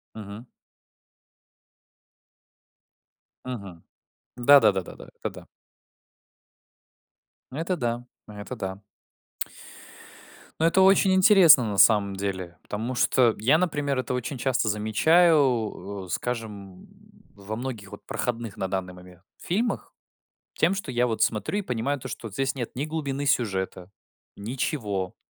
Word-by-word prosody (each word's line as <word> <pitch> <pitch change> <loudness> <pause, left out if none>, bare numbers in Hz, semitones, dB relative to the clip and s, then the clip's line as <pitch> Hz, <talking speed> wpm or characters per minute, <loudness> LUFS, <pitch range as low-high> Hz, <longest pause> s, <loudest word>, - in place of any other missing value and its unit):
Мгм. 110 +3 -9 3.0
Мгм. 100 -9 -7 0.5
Да 140 +3 +7
да 105 -2 +5
да 95 -1 -2
да - - -12
да. - - -13
Это - - -2
да. - - -13 2.1
Ну, 140 - -6
это 175 +2 -1
да. 120 -2 -2 0.2
Ну, 105 - -12
это 115 +5 -7
да. 95 0 -6 1.8
Ну, 165 - +4
это 190 +3 +3
очень 190 0 +5
интересно 185 - +7
на 100 -3 -3
самом 100 -3 +5
деле. 95 -3 -4
Потому 115 +5 -4
что 125 -2 +3
я, 135 +9 +3
например, 145 -6 -1
это 130 - -2
очень 125 +2 -3
часто 130 -2 0
замечаю, 110 - +2
э, - - -16
скажем, 105 -3 -5 0.5
во 100 +2 -6
многих 115 -5 -6
вот 105 - -11
проходных 120 -4 -3
на 95 - -2
данный 95 -1 -3
момент 90 0 -15 0.2
фильмах. 225 +7 -2 0.6
Тем, 175 +4 +2
что 175 -9 -5
я 120 0 +1
вот 110 - -3
смотрю 115 - 0
и - - -2
понимаю 130 +1 -2
то, - - -9
что 115 - -7
вот 100 - -13
здесь 135 +2 -1
нет 120 -4 -4
ни 140 - -1
глубины 145 -3 -3
сюжета, 95 -6 -1 0.5
ничего. 105 - -3
120 Hz, 135 wpm, -25 LUFS, 100-140 Hz, 3.0 s, Да